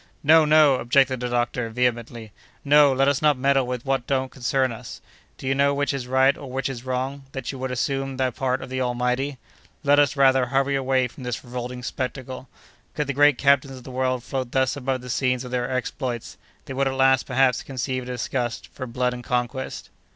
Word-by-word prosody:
"No! 160 +2 +6
no!" 150 -3 +5
objected 130 +1 +2
the 125 0 -3
doctor, 120 -1 -1
vehemently; 120 -2 -2 0.3
"no, 145 0 +6
let 135 +1 +2
us 140 -1 +1
not 150 -2 +3
meddle 135 0 +2
with 125 0 -4
what 135 -2 -1
don't 130 -1 0
concern 130 0 0
us. 115 +1 -9 0.4
Do - - -10
you 135 - +2
know 140 +1 +2
which 145 0 0
is 130 -3 -4
right 130 +2 +4
or 140 - -9
which 135 +1 -2
is 125 -3 -6
wrong, 130 +2 -3
that 135 -2 -4
you 135 - -9
would 130 0 -3
assume 135 +1 -2
the 130 -1 +1
part 130 +1 -2
of - - -9
the 130 0 -2
Almighty? 125 +3 -1 0.5
Let 145 0 +4
us, 145 -1 +3
rather, 130 -2 +4
hurry 135 +2 +1
away 130 -1 +1
from 125 - -14
this 125 -2 -4
revolting 125 0 -6
spectacle. 130 0 -5 0.5
Could 150 - -1
the 140 - -2
great 145 -1 +5
captains 140 -1 +2
of 125 - -12
the 130 - -9
world 130 -1 -1
float 130 -2 -4
thus 130 0 +2
above 130 -2 -2
the 125 - -10
scenes 125 -1 0
of 125 - -8
their 125 -1 -1
exploits, 130 -2 -3 0.3
they - - -6
would 135 +1 +1
at 135 - -2
last, 135 -1 +3
perhaps, 130 -1 +2
conceive 130 -1 -3
a - - -9
disgust 125 -1 -3
for 130 - -6
blood 125 +1 -1
and 125 0 -8
conquest." 125 +2 -3
130 Hz, 210 wpm, -24 LUFS, 125-135 Hz, 0.5 s, No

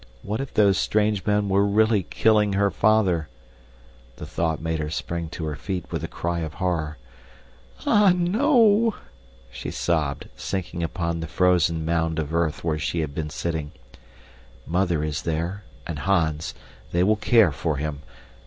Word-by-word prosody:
What 105 +5 -2
if 135 - -6
those 100 -2 +4
strange 105 -2 +1
men 105 0 +2
were 100 +1 +3
really 105 +1 +3
killing 105 +2 +2
her 100 0 +2
father! 95 -8 +2 0.9
The - - -8
thought 80 -2 -1
made 80 0 -2
her 75 -1 -2
spring 85 +1 -4
to 80 0 -5
her 75 -1 -3
feet 90 +3 -4
with - - -3
a - - -2
cry 85 0 -3
of 80 -2 -5
horror. 80 -5 -2 0.9
"Ah, 210 -2 +5
no!" 225 - +3 0.6
She - - -6
sobbed, - - -1
sinking 90 -2 -4
upon 85 0 -2
the 80 - -4
frozen 85 -2 +2
mound 80 -1 0
of 80 0 -3
earth 85 -2 0
where 80 -2 0
she 80 +2 -1
had 75 -3 -4
been 75 0 -3
sitting. 80 -1 -3 0.9
Mother 85 -3 0
is 75 -1 -2
there, 85 +5 -3 0.2
and - - -5
Hans. 80 -5 0 0.4
They 85 +1 +2
will 105 +3 +4
care 110 -4 +4
for 70 +2 -2
him. 70 0 -4
85 Hz, 160 wpm, -24 LUFS, 80-100 Hz, 0.9 s, Ah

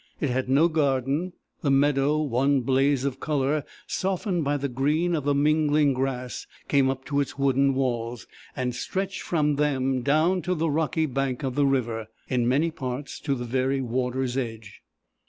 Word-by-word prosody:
It 145 - 0
had 130 0 -1
no 145 +5 +5
garden. 145 +2 0 0.3
The 145 - 0
meadow, 140 +1 +3
one 135 +1 +2
blaze 135 +2 +2
of 135 -1 -2
colour, 145 0 0 0.2
softened 185 -2 -1
by 145 +1 0
the 140 0 -2
green 150 +7 0
of 150 -4 -1
the 145 -1 +2
mingling 150 0 +3
grass, 130 -1 -3 0.2
came 140 -2 +3
up 135 0 -4
to 145 0 0
its 140 - -2
wooden 135 0 +2
walls, 120 -3 -2 0.3
and 125 -1 -2
stretched 190 +9 -3
from 150 -4 0
them 135 -3 +1
down 155 +7 +2
to 180 +1 -1
the 160 -1 0
rocky 160 +1 +1
bank 135 -1 -2
of 130 -2 -1
the 145 +1 +2
river, 115 -5 -1 0.2
in 125 -2 +1
many 145 +7 +2
parts 135 -2 -5
to 140 -2 -1
the 120 -1 -5
very 130 +3 0
water's 125 +1 -1
edge. 115 -4 -5
135 Hz, 175 wpm, -26 LUFS, 130-150 Hz, 0.3 s, no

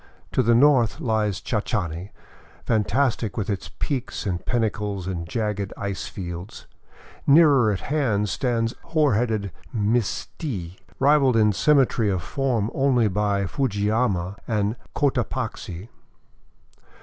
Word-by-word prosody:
To - - +2
the 115 +1 +3
north 130 -3 +4
lies 110 -5 0
Chachani, 100 -6 -2 0.6
fantastic 110 0 +1
with 105 -1 -1
its 100 - -4
peaks 130 -6 -3
and 90 -3 -2
pinnacles 105 -5 -1
and 85 -3 -4
jagged 105 -4 -2
ice 100 -1 -4
fields; 90 0 -7 0.6
nearer 140 -7 +6
at 95 - -3
hand 120 -9 0
stands 115 +1 0
hoar 155 -5 +2
headed 110 -3 0 0.2
Misti, 105 - -2 0.2
rivalled 135 -3 +4
in 105 -2 +4
symmetry 130 -4 +3
of 95 -4 -1
form 120 - -1
only 130 -5 +3
by 100 0 0
Fujiyama 105 -5 0
and 105 -1 0 0.2
Cotapaxi. 120 - -2
110 Hz, 115 wpm, -24 LUFS, 100-125 Hz, 0.6 s, nearer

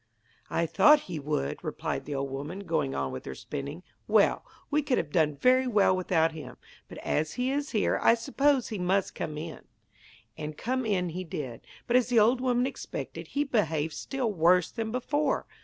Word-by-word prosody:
'I 170 - +1
thought 300 - +6
he 170 -4 -6
would,' 140 - -2
replied - - -3
the 145 - -4
old 135 0 -2
woman, 145 +8 -5
going 155 -7 -1
on 65 -1 -2
with 65 - -6
her 65 - -6
spinning. 145 - -6 0.2
'Well, - - +3 0.3
we 300 +1 +3
could 275 -3 0
have 145 - -2
done 155 -3 +2
very 255 - +3
well 205 -5 +4
without 170 -3 +2
him. 160 -1 -9 0.3
But - - -9
as 155 +1 0
he 250 +1 -1
is 290 +2 -1
here 215 -4 +1
I 230 - +6
suppose 275 +1 +1
he 215 - -4
must 185 +2 +1
come 150 -1 -4
in.' 160 +1 -7 0.7
And 150 -1 -6
come 255 0 -1
in 180 -4 +1
he 180 +3 -4
did. 135 -8 -6 0.2
But 245 - +4
as 250 -3 +2
the 245 -1 +1
old 240 +4 +4
woman 250 -1 +2
expected, 270 - -6
he 285 - 0
behaved 160 - 0
still 255 -6 -2
worse 175 0 +4
than 225 -2 -3
before. 285 +4 0
185 Hz, 190 wpm, -28 LUFS, 155-250 Hz, 0.7 s, thought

